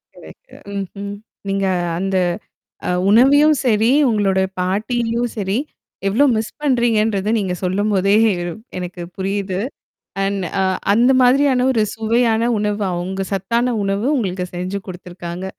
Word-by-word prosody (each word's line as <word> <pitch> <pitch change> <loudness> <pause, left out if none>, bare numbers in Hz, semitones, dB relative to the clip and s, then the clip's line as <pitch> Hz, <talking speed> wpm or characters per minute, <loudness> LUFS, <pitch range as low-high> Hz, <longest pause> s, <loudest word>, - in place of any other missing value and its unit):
Correct. - - -15 0.2
ம்ஹ்ம். 200 +1 -6 0.4
நீங்க 195 0 0 0.3
அந்த 190 +1 -1 0.7
அ - - 0 0.2
உணவையும் 285 +7 +6
சரி, 220 -1 +3 0.2
உங்களுடைய 195 -3 +1
பாட்டியும் 230 +5 -1
சரி. 195 0 -1 0.5
எவ்ளோ 225 +9 +3
மிஸ் 220 0 -3
பண்றீங்கன்றது 225 -7 +1
நீங்க 190 -4 -1
சொல்லும்போதே 195 +1 +1 0.6
எனக்கு 180 0 -6 0.2
புரியுது. 195 -1 -2 0.7
அண்ட் 195 -1 -1 0.2
அ - - +3 0.3
அந்த 235 +5 +4
மாதிரியான 255 0 +4
ஒரு 225 -4 +2
சுவையான 225 0 +1 0.2
உணவு. 210 0 -1
அவுங்க 185 +2 -3
சத்தான 235 +6 0
உணவு 195 +3 -1
உங்களுக்கு 185 -6 -2
செஞ்சு 185 +3 -3
குடுத்துருக்காங்க. 180 0 -7
205 Hz, 115 wpm, -19 LUFS, 190-235 Hz, 0.7 s, உணவையும்